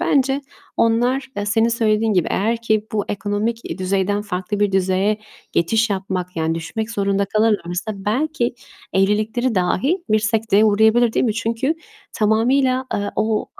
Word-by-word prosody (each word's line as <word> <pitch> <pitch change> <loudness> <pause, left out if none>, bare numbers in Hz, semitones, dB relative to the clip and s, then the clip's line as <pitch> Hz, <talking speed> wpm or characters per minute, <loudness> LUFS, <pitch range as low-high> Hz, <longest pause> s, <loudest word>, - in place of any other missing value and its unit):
bence 275 -4 +2 0.4
onlar, 245 +4 +1
e, 205 0 -2
senin 225 +2 +2
söylediğin 220 -1 +1
gibi, 180 -4 +1
eğer 225 +4 +1
ki 215 -2 +1
bu 210 -2 0
ekonomik 210 +3 -2
i - - -5
düzeyden 195 +2 0
farklı 200 0 -3
bir 205 -1 +2
düzeye 190 +3 +1 0.3
geçiş 220 +6 +2
yapmak, 185 -2 -3
yani 160 0 0
düşmek 215 +7 -4
zorunda 200 -2 0
kalırlarsa 210 -2 0
belki 235 +6 -1 0.4
evlilikleri 215 +5 +1
dahi 270 - 0
bir 215 - +5
sekteye 215 -1 +2
uğrayabilir, 220 +2 +4
değil - - +1
mi? 215 - 0
Çünkü 230 +6 -1 0.4
tamamıyla, 255 +4 +2
eee, 205 0 -2
o, 215 0 +1
ııı, - - -7
215 Hz, 150 wpm, -20 LUFS, 200-230 Hz, 0.4 s, bir